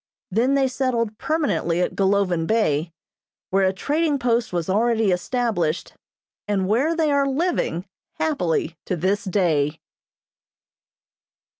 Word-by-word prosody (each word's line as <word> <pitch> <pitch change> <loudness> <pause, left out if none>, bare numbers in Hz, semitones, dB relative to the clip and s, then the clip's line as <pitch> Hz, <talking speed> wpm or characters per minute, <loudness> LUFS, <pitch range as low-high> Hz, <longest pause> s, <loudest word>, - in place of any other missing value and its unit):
Then 245 +8 +2
they 270 -1 +3
settled 240 -4 -1
permanently 290 - 0
at 180 - -1
Golovin 190 -4 +1
Bay, 170 -8 +1 0.6
where 195 0 +3
a - - +2
trading 295 +9 0
post 235 -2 0
was 175 -2 -2
already 220 +1 +2
established, 180 -4 -1 0.5
and 195 -2 0
where 265 - +2
they 315 -3 +1
are 280 -1 +2
living 275 - -1 0.3
happily 180 - 0
to 180 - -1
this 190 +6 0
day. 165 -7 +1
210 Hz, 120 wpm, -23 LUFS, 180-265 Hz, 0.6 s, they